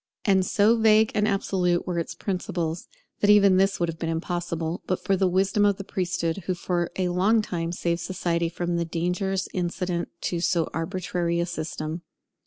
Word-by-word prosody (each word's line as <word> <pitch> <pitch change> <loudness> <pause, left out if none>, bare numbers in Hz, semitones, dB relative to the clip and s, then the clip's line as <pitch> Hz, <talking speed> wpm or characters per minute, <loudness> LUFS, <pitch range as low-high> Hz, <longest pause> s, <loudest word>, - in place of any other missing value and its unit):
And 190 -2 +4
so 210 +5 +3
vague 220 -1 +5
and 210 0 +2
absolute 185 -3 +1
were 180 -2 -1
its 165 - -4
principles, 175 -3 -3 0.3
that 205 - +2
even 200 -2 +6
this 195 +1 +2
would 170 - +1
have 165 0 -5
been 165 - -2
impossible, 170 0 -3
but 185 - -1
for 195 - +2
the 190 0 +2
wisdom 190 +3 +2
of 205 -1 +3
the 195 - -6
priesthood, 175 -3 -2
who 185 - 0
for 175 -1 -1
a 185 -1 +1
long 200 +5 +3
time 170 -4 -3
saved 170 -1 -1
society 170 -2 -1
from 175 0 -2
the 170 - +1
dangers 180 +3 -1
incident 175 -1 -2
to 175 - -1
so 170 -1 +1
arbitrary 170 0 -2
a 170 - +1
system. 160 -1 -4
180 Hz, 185 wpm, -25 LUFS, 170-195 Hz, 0.3 s, even